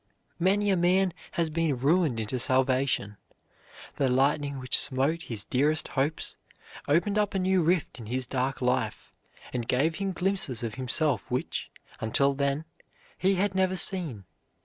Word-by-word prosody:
Many 200 Hz, +3 st, +2 dB
a -, -, +3 dB
man 180 Hz, +1 st, +2 dB, 0.2 s
has 165 Hz, -2 st, 0 dB
been 160 Hz, -4 st, 0 dB
ruined 145 Hz, -1 st, +2 dB
into 110 Hz, +3 st, -2 dB
salvation. 130 Hz, -5 st, +1 dB, 0.8 s
The 135 Hz, -2 st, +2 dB
lightning 140 Hz, +2 st, +1 dB
which 125 Hz, -1 st, +1 dB
smote 140 Hz, +6 st, +2 dB
his 110 Hz, -8 st, -4 dB
dearest 150 Hz, +5 st, +1 dB
hopes 145 Hz, +4 st, -2 dB, 0.5 s
opened 200 Hz, +8 st, +2 dB
up 205 Hz, -1 st, 0 dB
a -, -, +2 dB
new 185 Hz, 0 st, +2 dB
rift 165 Hz, -5 st, 0 dB
in 110 Hz, -, -9 dB
his 130 Hz, +3 st, -1 dB
dark 130 Hz, +1 st, -2 dB
life, 125 Hz, 0 st, -1 dB, 0.4 s
and 120 Hz, -2 st, -3 dB
gave 150 Hz, +7 st, +1 dB
him 195 Hz, -1 st, -2 dB
glimpses 180 Hz, -, -1 dB
of 115 Hz, -2 st, -3 dB
himself 130 Hz, -, 0 dB
which, -, -, -3 dB, 0.3 s
until 140 Hz, +5 st, +2 dB
then, 140 Hz, +2 st, -1 dB, 0.5 s
he 195 Hz, +1 st, +2 dB
had 195 Hz, +1 st, 0 dB
never 190 Hz, 0 st, +1 dB
seen. 170 Hz, -, +1 dB
145 Hz, 150 wpm, -28 LUFS, 130-180 Hz, 0.8 s, a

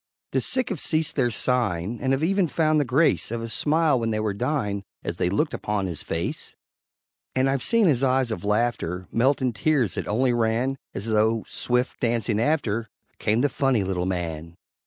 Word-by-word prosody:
The -, -, +1 dB
sick 255 Hz, -1 st, 0 dB
have 190 Hz, -, -3 dB
ceased 160 Hz, 0 st, 0 dB
their 125 Hz, -4 st, +2 dB
sighing, 115 Hz, -4 st, -1 dB
And 130 Hz, -, 0 dB
have 135 Hz, +3 st, +1 dB
even 195 Hz, +1 st, +2 dB
found 155 Hz, -1 st, +2 dB
the 145 Hz, -, +1 dB
grace 125 Hz, -, +2 dB
Of 115 Hz, 0 st, -3 dB
a -, -, -4 dB
smile 150 Hz, +5 st, +2 dB
when 115 Hz, -1 st, -1 dB
they 110 Hz, -1 st, -1 dB
were 110 Hz, -1 st, -1 dB
dying 105 Hz, -4 st, -1 dB, 0.2 s
As 85 Hz, -, -4 dB
they 90 Hz, -, +2 dB
looked 150 Hz, -, 0 dB
upon 105 Hz, -2 st, -2 dB
his 85 Hz, -5 st, -4 dB
face; 80 Hz, +1 st, -4 dB, 0.8 s
And 130 Hz, +1 st, +3 dB
I've 135 Hz, -1 st, 0 dB
seen 230 Hz, -2 st, +3 dB
his 140 Hz, -7 st, +3 dB
eyes 130 Hz, -2 st, +2 dB
of 90 Hz, -6 st, -4 dB
laughter 105 Hz, -5 st, -1 dB
Melt 130 Hz, +4 st, +2 dB
in 125 Hz, -2 st, +1 dB
tears 130 Hz, -, +1 dB
that -, -, -4 dB
only 125 Hz, +4 st, +2 dB
ran 120 Hz, +3 st, 0 dB, 0.2 s
As 100 Hz, -, -4 dB
though, 110 Hz, 0 st, +1 dB
swift 125 Hz, +1 st, -1 dB
dancing 115 Hz, -3 st, 0 dB
after, 115 Hz, -5 st, 0 dB, 0.3 s
Came 110 Hz, +3 st, +1 dB
the 145 Hz, -, +4 dB
Funny 130 Hz, -5 st, +1 dB
Little 95 Hz, -1 st, -2 dB
Man. 85 Hz, -3 st, -4 dB
120 Hz, 195 wpm, -25 LUFS, 105-135 Hz, 0.8 s, the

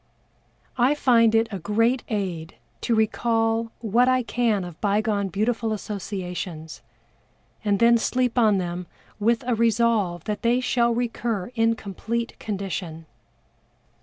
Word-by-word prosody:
I 255 Hz, +5 st, +4 dB
find 230 Hz, -5 st, +4 dB
it 225 Hz, 0 st, +3 dB
a 195 Hz, -, -4 dB
great 230 Hz, +8 st, +1 dB
aid 180 Hz, -7 st, -3 dB, 0.3 s
to 235 Hz, -, +1 dB
recall 225 Hz, +1 st, +1 dB
what 235 Hz, +3 st, +3 dB
I 255 Hz, -1 st, +2 dB
can 230 Hz, -4 st, 0 dB
of 175 Hz, -2 st, -10 dB
bygone 205 Hz, 0 st, +1 dB
beautiful 220 Hz, +4 st, -1 dB
associations, 180 Hz, -6 st, -6 dB, 0.8 s
and 205 Hz, -2 st, +2 dB
then 235 Hz, +2 st, +5 dB
sleep 250 Hz, +1 st, 0 dB
on 220 Hz, -5 st, +4 dB
them 175 Hz, -1 st, -4 dB, 0.3 s
with 230 Hz, +2 st, +1 dB
a 250 Hz, -, +1 dB
resolve 225 Hz, -6 st, +1 dB
that 210 Hz, -1 st, -4 dB
they 240 Hz, +2 st, +2 dB
shall 245 Hz, -2 st, +1 dB
recur 235 Hz, -3 st, -2 dB
in 230 Hz, -1 st, +2 dB
complete 230 Hz, +3 st, -4 dB
condition. 190 Hz, -6 st, -5 dB
220 Hz, 130 wpm, -24 LUFS, 195-235 Hz, 0.8 s, then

